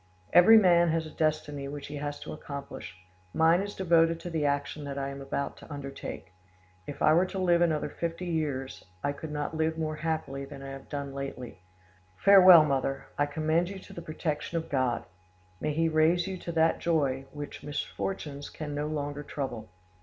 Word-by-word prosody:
"Every 220 +6 +9
man 175 -4 +5
has 160 0 0
a 155 - -9
destiny 150 -3 -1
which 145 0 -6
he 145 - -6
has 145 0 -4
to - - -6
accomplish: 140 - -8 0.4
mine 165 +3 +5
is 205 0 -5
devoted 165 -2 +3
to 175 - -6
the 160 -3 0
action 145 +1 -2
that 140 0 -5
I 135 0 -2
am 140 0 -7
about 135 +1 -3
to - - -13
undertake; 135 -9 -7 0.5
if 145 - -5
I 155 - +6
were 175 +3 +4
to 190 - -6
live 175 -2 +3
another 160 -3 +2
fifty 170 +2 -4
years, 150 -6 -3 0.2
I 140 - +1
could 150 +2 -7
not 150 +1 -3
live 160 0 0
more 155 -1 -2
happily 155 -4 -3
than 135 0 -9
I 135 - -7
have 135 0 -9
done 140 -1 -4
lately. 135 -7 -6 0.6
Farewell, 185 -5 +9
mother: 135 -1 -1
I 145 - +3
commend 155 +4 0
you 195 - -6
to 190 - -12
the 170 - -7
protection 155 +1 -3
of 165 - -4
God; 130 -4 +1 0.6
may 150 - -1
He 165 +2 +1
raise 160 +2 +3
you 190 0 -4
to 175 -1 -6
that 165 0 +3
joy 140 -5 0
which 145 0 -7
misfortunes 145 -1 -4
can 150 -2 -6
no 145 +1 -2
longer 145 -1 -3
trouble! 130 -7 -5
155 Hz, 190 wpm, -29 LUFS, 140-165 Hz, 0.6 s, Every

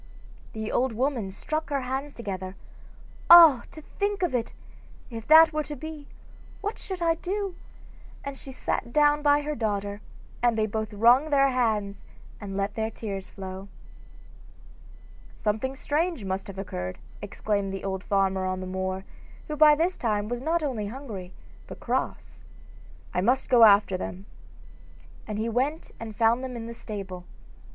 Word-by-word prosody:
The 220 0 -4
old 255 -1 +1
woman 245 -3 -1
struck 310 +10 -4
her 280 -2 0
hands 265 +3 -4
together: 190 -4 -5 0.7
'Ah, 330 -7 +9
to 310 - -12
think 405 +2 -2
of 345 - 0
it! 235 -2 -1 0.6
if 225 -1 -7
that 320 +1 +8
were 305 - 0
to 295 - -6
be, 305 0 -8 0.5
what 415 +2 -4
should 370 -3 -5
I 330 -1 +4
do?' 385 +3 -3 0.7
and 280 0 -5
she 270 - -10
sat 245 -2 -3
down 295 +1 +4
by 290 0 +4
her 300 +1 -3
daughter, 205 -3 -2 0.4
and 240 -2 +2
they 215 - +2
both 220 0 -3
wrung 240 +8 +4
their 275 -2 +4
hands 215 -6 0 0.4
and 195 -2 -6
let 200 +1 -1
their 220 0 -2
tears 200 -4 -6
flow. 190 0 -8 1.7
'Something 220 +5 -1
strange 305 - -1
must 190 +3 -3
have 195 -1 -9
occurred,' 90 - -5 0.2
exclaimed 205 -1 -2
the 195 - -5
old 190 -1 -3
farmer 195 -1 +1
on 185 0 -2
the 185 - -5
moor, 190 +1 -3 0.4
who 300 - -2
by 300 0 +7
this 340 +4 0
time 210 -3 0
was 240 +1 -3
not 325 +3 0
only 235 -8 -2
hungry, 210 -7 -7 0.4
but - - -9
cross. - - -3 0.7
'I 180 - +1
must 250 +7 +1
go 240 -2 +7
after 200 -2 +5
them.' 185 +1 -6 1.0
And 210 -1 -4
he 220 +2 -1
went 265 +7 -1
and 220 -2 -7
found 230 +3 +3
them 255 -1 -5
in 230 -1 -6
the 235 - -6
stable. 195 -5 -7
230 Hz, 160 wpm, -27 LUFS, 200-290 Hz, 1.7 s, Ah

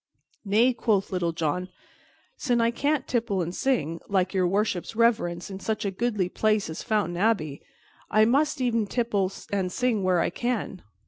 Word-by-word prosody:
"Nay," 225 +5 +3
quoth 220 -4 0
Little 175 -3 0
John, 165 +3 -2 0.7
"sin' 245 -4 0
I 230 0 +3
cannot 285 +3 0
tipple 225 -6 0
and 170 +1 -5
sing, 185 - -1
like 190 -1 +1
Your 185 -2 +2
Worship's 195 +1 -1
reverence, 205 -6 +1
in 190 - -6
such 215 +2 -2
a 200 - 0
goodly 210 -2 -1
place 215 -1 0
as 160 - -6
Fountain 210 -6 0
Abbey, 180 -9 0 0.5
I 215 0 +5
must 280 +5 +2
e'en 230 -4 +1
tipple 205 -5 0 0.2
and 190 -2 0
sing 245 -1 0
where 185 -2 +2
I - - +1
can." 240 -6 -3
210 Hz, 170 wpm, -26 LUFS, 185-235 Hz, 0.7 s, I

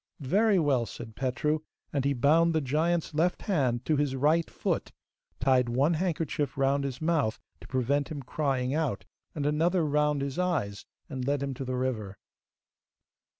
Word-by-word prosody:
'Very 200 - +3
well,' 135 -8 +2
said 110 +1 -9
Petru, 135 +4 0 0.3
and 140 -2 0
he 140 - +2
bound 160 +6 +3
the - - +4
giant's 160 +5 0
left 170 +4 +1
hand 130 - 0
to 155 - +2
his 145 -2 0
right 155 +5 +2
foot, - - -2 0.5
tied 125 -1 +3
one 135 +7 +2
handkerchief 155 -4 -1
round 135 +1 +2
his 130 -2 -4
mouth 155 -9 +1 0.2
to - - -13
prevent 135 +3 0
him 145 -4 -5
crying 130 -1 -1
out, 150 -10 -1 0.3
and 145 -2 -2
another 165 +4 +2
round 150 -1 +1
his 140 +3 -3
eyes, 135 - -1 0.2
and 130 -3 -4
led 140 0 +1
him 140 -1 -2
to 135 - -5
the 130 0 -3
river. 115 -6 -2
140 Hz, 165 wpm, -29 LUFS, 130-155 Hz, 0.5 s, the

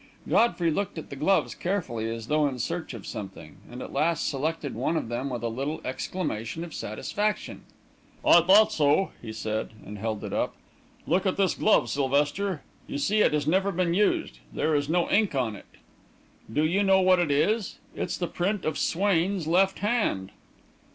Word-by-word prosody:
Godfrey 175 -8 +3
looked 190 +2 -2
at 160 - -7
the - - -5
gloves 155 +8 +2
carefully, 130 - -2
as 115 -1 -5
though 150 +2 +2
in 135 -2 -4
search 160 +2 -3
of 110 - -9
something, 95 -7 -8
and 125 +1 -7
at - - -9
last 165 0 +1
selected 150 0 -2
one 135 +8 -1
of 115 - -3
them 120 +4 -2
with 120 -3 -4
a - - 0
little 135 +7 -3
exclamation 140 -1 -3
of 170 -3 -8
satisfaction. 205 - -3 0.6
"I 170 - +8
thought 195 +5 +6
so!" 150 +5 +2
he 110 - -7
said, 110 0 -3
and 105 +1 -8
held 110 0 -3
it - - -5
up. - - -1 0.5
"Look 185 +4 +1
at 185 - 0
this 195 -2 +2
glove, 215 - +3
Sylvester. 145 +5 0 0.2
You - - -4
see 210 +9 +2
it - - +4
has 150 -1 0
never 190 +5 +2
been 175 -2 0
used 205 +3 +1
there 160 - 0
is 145 0 0
no 175 +1 +2
ink 205 -6 +2
on 120 -5 0
it. - - -13 0.8
Do 150 +7 +2
you 180 +6 +2
know 195 -1 +5
what 185 -1 +5
it 175 -3 +1
is? 195 +9 +1 0.2
It's - - -3
the 175 - -1
print 185 +4 -2
of 155 -2 -1
Swain's 190 -1 +1
left 190 +4 +3
hand." 210 - 0
160 Hz, 185 wpm, -27 LUFS, 130-190 Hz, 0.8 s, I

